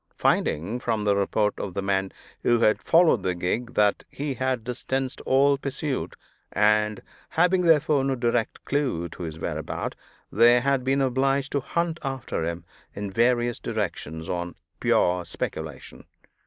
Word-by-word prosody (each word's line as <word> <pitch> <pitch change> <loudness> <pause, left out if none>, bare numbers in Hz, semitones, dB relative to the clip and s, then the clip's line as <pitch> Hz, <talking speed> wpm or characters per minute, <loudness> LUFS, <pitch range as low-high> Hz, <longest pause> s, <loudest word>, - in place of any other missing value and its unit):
Finding, 100 +11 +1
from 115 -4 -1
the 100 -1 +3
report 105 +1 0
of 95 - -5
the 100 - -1
men 95 -1 0 0.3
who 120 -1 +2
had 110 -1 +3
followed 165 - +4
the 90 -1 -1
gig, 115 +8 -2
that 105 -1 +3
he 145 0 -3
had 130 -2 -1
distanced 130 +2 -3
all 140 +1 +4
pursuit, 140 0 -3 0.4
and 105 0 +2 0.3
having 180 +2 +3
therefore 150 -4 +4
no 135 0 0
direct 120 -2 -1
clew 130 - -1
to 85 - -11
his 80 -2 -5
whereabout, - - -4 0.4
they 120 +1 +6
had 135 0 +1
been 135 +2 +1
obliged 135 +1 +1
to 140 - +1
hunt 170 +4 -2
after 135 - -3
him 85 +1 -3 0.3
in 100 -1 -4
various 120 +2 +2
directions, 85 -7 -4
on 85 -1 -3 0.2
pure 90 0 +2
speculation. 80 -4 -6
120 Hz, 150 wpm, -25 LUFS, 100-135 Hz, 0.4 s, they